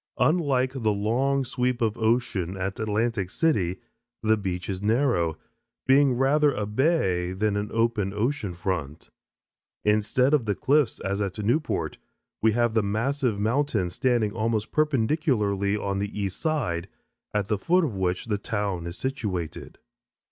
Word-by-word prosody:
Unlike 135 -3 +1
the 110 -1 +2
long 130 +7 +1
sweep 125 0 -1
of 110 -3 +1
ocean 110 -6 0
at 95 +1 -3
Atlantic 110 -2 0
City, 95 - +1 0.5
the 110 0 +4
beach 95 -4 -4
is 95 -2 -3
narrow, 110 - +1 0.5
being 135 -1 +5
rather 145 +3 +3
a 105 - -2
bay 105 - +1
than 105 +2 0
an 105 0 -2
open 115 -4 +1
ocean 105 -2 -2
front. 85 -5 -4 0.7
Instead 110 +6 +2
of 140 -6 +3
the 105 -2 0
cliffs 145 -1 +2
as 100 +1 -2
at 100 -1 -3
Newport, 120 +9 -1 0.4
we 110 0 +4
have 120 0 +1
the 110 - +3
massive 115 +2 0
mountains 110 -5 0
standing 120 -4 +1
almost 110 0 -1
perpendicularly 115 - +1
on 100 -1 -2
the 100 +1 -4
east 100 -2 -3
side, 95 - -1 0.4
at 105 -2 -1
the 105 -2 0
foot 180 - +3
of 140 -9 -1
which 90 -1 -1
the 105 -3 -1
town 100 -6 -2
is 85 - -6
situated. 105 - -4
110 Hz, 150 wpm, -26 LUFS, 100-130 Hz, 0.7 s, being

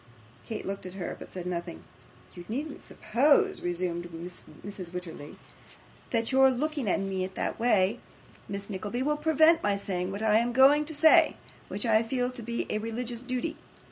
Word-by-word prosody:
Kate 220 - -4
looked 195 -1 -5
at 185 - -9
her, 180 -3 -4
but - - -10
said 180 -2 -6
nothing. 170 - -4 0.5
'You 175 - -9
needn't 285 +6 -4
suppose,' 255 +7 +2
resumed 175 -1 -2 0.6
Mrs. 195 -4 -6
Wititterly, 175 -5 -7 0.7
'that 230 0 0
your 265 0 +6
looking 280 -2 -1
at - - +2
me 195 -1 -2
in 185 - -3
that - - -3
way, 215 -2 +3 0.5
Miss 200 0 -5
Nickleby, 210 +5 -3
will 300 +2 +1
prevent 315 +2 +4
my 205 -1 +1
saying 185 -2 -3
what 200 +2 -4
I 215 -1 +4
am 240 +1 0
going 280 +4 +6
to 315 0 -6
say, 315 +2 +6 0.3
which - - -3
I 220 -1 +4
feel 245 +2 -1
to 250 -1 -8
be 235 +1 -3
a 215 - 0
religious 230 +2 -4
duty. 255 +5 -3
225 Hz, 175 wpm, -28 LUFS, 190-265 Hz, 0.7 s, your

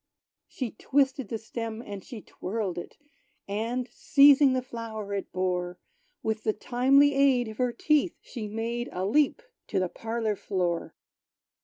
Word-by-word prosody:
She 250 -5 -4
twisted 270 +1 +1
the 225 - -2
stem, 225 0 -5
and 200 -3 -7
she 225 -4 -9
twirled 190 -3 -4
it; - - -10 0.5
And 230 +5 -2
seizing 280 -1 +6
the 255 -1 0
flower 225 -4 -6
it 200 - -4
bore, 180 -1 -1 0.5
With 220 0 -1
the 215 - +1
timely 270 +6 +4
aid 270 -3 +3
of 215 - -9
her 250 -1 +2
teeth, 300 +7 +1
she 225 -4 -7
made 230 +3 -3
A 185 +1 -2
leap 295 - +2 0.2
to - - -2
the 185 -1 0
parlor 225 0 -2
floor. 175 -4 -2
230 Hz, 150 wpm, -28 LUFS, 205-255 Hz, 0.5 s, seizing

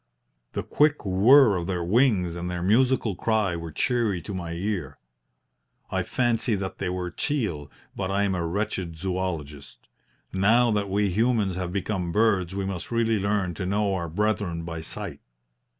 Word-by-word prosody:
The - - -2
quick 150 -4 +2
whirr 105 +5 +6
of 85 -1 -3
their 90 -2 -1
wings 100 -3 +2
and 85 +1 -4
their 90 -1 -3
musical 115 +1 +2
cry 105 -2 +1
were 85 -1 -6
cheery 115 - 0
to 100 - -6
my 85 -3 -4
ear. 95 +2 -3 0.9
I - - 0
fancy 120 -2 0
that 95 -1 -5
they - - -1
were 90 -1 -3
teal, 95 - -2 0.3
but 95 -1 -3
I 100 +1 +1
am 100 -1 +1
a 90 -2 -1
wretched 90 -2 -3
zoologist. 85 -5 -4 0.5
Now 115 +5 +4
that 105 -2 0
we 100 0 +1
humans 110 -1 +1
have 90 -1 -3
become 95 -2 -2
birds 100 -3 +2
we 100 -1 -2
must 95 -3 -4
really 115 -2 +1
learn 100 -2 0
to 90 - -4
know 100 +1 +1
our 85 -3 -2
brethren 100 -2 -1
by 80 -1 -5
sight. 80 - -6
95 Hz, 165 wpm, -26 LUFS, 90-110 Hz, 0.9 s, whirr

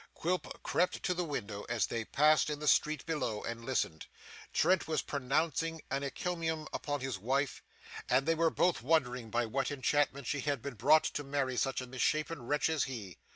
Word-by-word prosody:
Quilp 180 +2 -2
crept 180 - 0
to 180 - +1
the 180 0 -1
window 110 -10 -4
as 115 -6 +2
they 115 -1 -3
passed 155 +4 +4
in 150 - -2
the 150 +1 -5
street 155 +2 +3
below, 130 -10 -2
and 115 0 -5
listened. 115 -11 -1 0.4
Trent 180 +2 +3
was 160 -1 0
pronouncing 155 +4 0
an 135 +1 0
encomium 160 +2 -2
upon 145 -2 -2
his 130 -6 -3
wife, 135 +6 0 0.5
and 130 +2 +3
they 165 - +3
were 165 0 +3
both 175 -2 +1
wondering 125 -5 +1
by 120 +1 +1
what 135 +5 -1
enchantment 140 0 +1
she 145 - -1
had 145 -1 0
been 140 - -4
brought 145 +7 +5
to 145 - -2
marry 135 -2 -1
such 135 +1 0
a - - -5
misshapen 150 +5 -1
wretch 150 +2 +2
as 160 -3 +1
he. 110 -9 -7
140 Hz, 190 wpm, -33 LUFS, 125-155 Hz, 0.5 s, brought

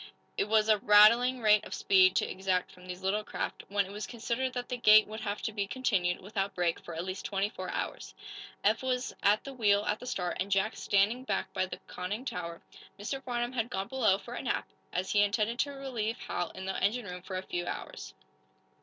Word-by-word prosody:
It - - +1
was 215 0 +3
a 215 -1 +4
rattling 230 +5 +6
rate 210 -1 +5
of - - -6
speed 185 -1 +5
to - - +2
exact 185 -1 -1
from 180 0 -15
these 180 +1 -7
little 205 +3 0
craft, - - -4
when 200 0 +1
it 190 - -10
was 205 -1 -5
considered 240 +2 -2
that 245 -1 -4
the 250 - -3
gait 215 -2 +7
would 215 +1 -7
have 205 0 -3
to 220 - -1
be 200 -2 -2
continued, 195 -8 0
without 195 0 -3
break, 175 -2 0
for 170 - -9
at 165 +2 -3
least 185 0 -5
twenty 200 0 -1
four - - -6
hours. - - -4 0.5
Eph 215 +2 +3
was 255 -1 -1
at 205 +2 +3
the 275 - -7
wheel, 205 -4 +3
at 210 - 0
the 250 - -9
start, 180 -6 -2
and 190 - -1
Jack 195 +2 +1
standing 210 +5 +2
back - - -2
by 185 - 0
the - - -6
conning 205 +8 -5
tower. 170 -7 -5 0.4
Mr. 265 +7 -4
Farnum 240 0 -2
had 235 -2 -1
gone 195 -3 -3
below, 225 -8 +3
for 235 +4 -10
a - - -4
nap, - - -2 0.2
as 185 +1 -2
he 205 - +4
intended 215 +3 +1
to 285 - +1
relieve 250 -5 -3
Hal 175 - -2
in 190 0 -8
the 190 - -3
engine 235 +3 +1
room 180 -2 -6
after 185 +1 -7
a 185 - -3
few 175 -1 -4
hours. - - -6
205 Hz, 225 wpm, -30 LUFS, 190-235 Hz, 0.5 s, gait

